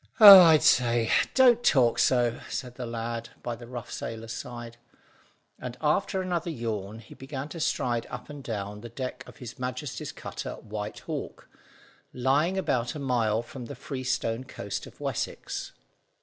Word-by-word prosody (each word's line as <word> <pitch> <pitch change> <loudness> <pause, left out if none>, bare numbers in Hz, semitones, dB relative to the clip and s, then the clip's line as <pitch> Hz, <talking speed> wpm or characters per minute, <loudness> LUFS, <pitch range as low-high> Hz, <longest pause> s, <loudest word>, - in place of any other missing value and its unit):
"Oh, 200 -3 +13
I 165 -3 +7
say, 120 -5 +3 0.2
don't 245 -2 +6
talk 125 -5 +4
so," 120 -2 +2
said 125 -2 -4
the 125 -1 -6
lad 115 0 -4
by 120 - -3
the 120 0 -12
rough 120 -1 -7
sailor's 115 0 -5
side; 120 0 -7 0.8
and 125 -1 -6
after 185 +5 +1
another 175 -2 -2
yawn 110 -7 -4
he 115 0 -13
began 135 +1 -7
to 165 - -7
stride 120 -6 0
up - - -7
and 145 -2 -9
down 105 -2 -5
the 120 - -8
deck 130 +2 -5
of - - -13
His 125 -1 -9
Majesty's 125 +2 -4
cutter - - -6
White 105 0 -6
Hawk, - - -6 0.7
lying 145 +9 +1
about 125 -8 0
a - - -5
mile 120 -5 +1
from 125 +1 -9
the - - -8
Freestone 130 -3 -2
coast 130 - -6
of - - -16
Wessex. - - -4
125 Hz, 160 wpm, -27 LUFS, 115-140 Hz, 0.8 s, Oh